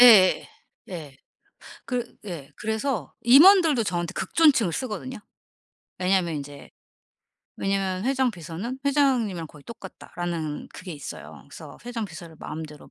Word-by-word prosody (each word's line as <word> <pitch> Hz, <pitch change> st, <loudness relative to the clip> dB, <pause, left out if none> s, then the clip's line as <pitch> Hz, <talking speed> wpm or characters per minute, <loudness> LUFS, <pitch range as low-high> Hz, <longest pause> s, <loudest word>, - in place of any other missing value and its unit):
예예예. 215 Hz, -7 st, +8 dB, 0.4 s
예. 155 Hz, -7 st, -7 dB, 0.7 s
그 245 Hz, -2 st, -3 dB
예. 165 Hz, -8 st, -7 dB
그래서 220 Hz, -, -2 dB
임원들도 300 Hz, -, +7 dB
저한테 175 Hz, -3 st, -2 dB
극존칭을 255 Hz, -, +3 dB
쓰거든요. 255 Hz, +3 st, -4 dB, 0.8 s
왜냐면 185 Hz, -2 st, +2 dB
인제 145 Hz, 0 st, -8 dB, 0.9 s
왜냐면 195 Hz, 0 st, -1 dB
"회장 265 Hz, -1 st, +2 dB
비서는 180 Hz, +8 st, -6 dB
회장님이랑 255 Hz, -, +2 dB
거의 150 Hz, -2 st, -16 dB
똑같다."라는 175 Hz, -7 st, -5 dB
그게 185 Hz, -2 st, -7 dB
있어요. 145 Hz, -2 st, -9 dB
그래서 -, -, -11 dB
회장 235 Hz, -3 st, -3 dB
비서를 165 Hz, -2 st, -10 dB
마음대로 155 Hz, -1 st, -8 dB
195 Hz, 305 characters per minute, -25 LUFS, 170-245 Hz, 0.9 s, 예예예